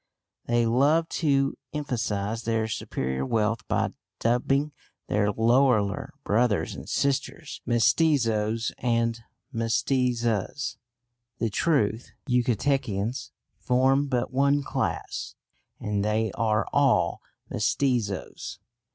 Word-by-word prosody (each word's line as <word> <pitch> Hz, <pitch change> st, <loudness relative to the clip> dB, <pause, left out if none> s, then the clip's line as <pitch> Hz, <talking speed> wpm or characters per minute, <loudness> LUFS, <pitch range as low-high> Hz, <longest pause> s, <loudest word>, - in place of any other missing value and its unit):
They 120 Hz, 0 st, +2 dB
love 145 Hz, +8 st, +3 dB
to 140 Hz, -4 st, +1 dB, 0.2 s
emphasise 110 Hz, -6 st, -2 dB
their 115 Hz, -1 st, 0 dB
superior 65 Hz, -10 st, -3 dB
wealth 115 Hz, +7 st, 0 dB
by -, -, 0 dB, 0.3 s
dubbing 135 Hz, +5 st, +1 dB, 0.3 s
their 105 Hz, 0 st, +1 dB
lowlier 115 Hz, -2 st, +2 dB
brothers 105 Hz, -6 st, +1 dB
and -, -, -9 dB
sisters 140 Hz, -1 st, -1 dB
mestizos 115 Hz, -3 st, +2 dB
and 115 Hz, -1 st, +1 dB, 0.3 s
mestizas. 115 Hz, +1 st, 0 dB, 0.6 s
The 115 Hz, -3 st, -1 dB
truth 115 Hz, -5 st, +1 dB
is -, -, -22 dB
the 125 Hz, -3 st, +3 dB
Yucatecans 120 Hz, -2 st, -1 dB, 0.3 s
form 135 Hz, +3 st, +2 dB
but 125 Hz, -1 st, -1 dB
one 140 Hz, +2 st, +3 dB
class, -, -, -3 dB, 0.4 s
and 105 Hz, -1 st, -1 dB
they 110 Hz, 0 st, +1 dB
are 110 Hz, -2 st, +1 dB
all -, -, +3 dB, 0.3 s
mestizos. 115 Hz, -9 st, -1 dB
115 Hz, 100 wpm, -26 LUFS, 110-135 Hz, 0.6 s, love